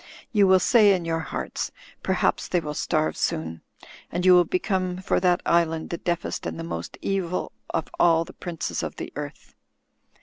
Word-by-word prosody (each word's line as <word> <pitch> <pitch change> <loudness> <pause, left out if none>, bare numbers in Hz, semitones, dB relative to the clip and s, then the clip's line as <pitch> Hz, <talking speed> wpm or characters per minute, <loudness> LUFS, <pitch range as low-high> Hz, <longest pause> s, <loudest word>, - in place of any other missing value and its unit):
You 205 -4 +5
will 190 0 +7
say 205 +1 +5
in 175 -2 -4
your 165 0 0
hearts: 160 - -4 0.3
Terhaps - - +1
they 180 - +2
will 150 -3 -5
starve 155 +1 0
soon'; 80 +1 -2 0.5
and 180 +1 -1
you 185 - +8
will 180 -1 +6
become, 185 +1 -1
for 190 - 0
that 180 -1 +2
island, 165 -1 +1
the 170 - -3
deafest 175 -1 -2
and - - -4
the - - -4
most 85 - -5
evil 185 -2 -1 0.2
of 165 - -1
all 165 -1 +5
the - - -12
princes 170 -2 -4
of - - -4
the - - -7
earth." - - -7
175 Hz, 180 wpm, -25 LUFS, 165-185 Hz, 0.5 s, you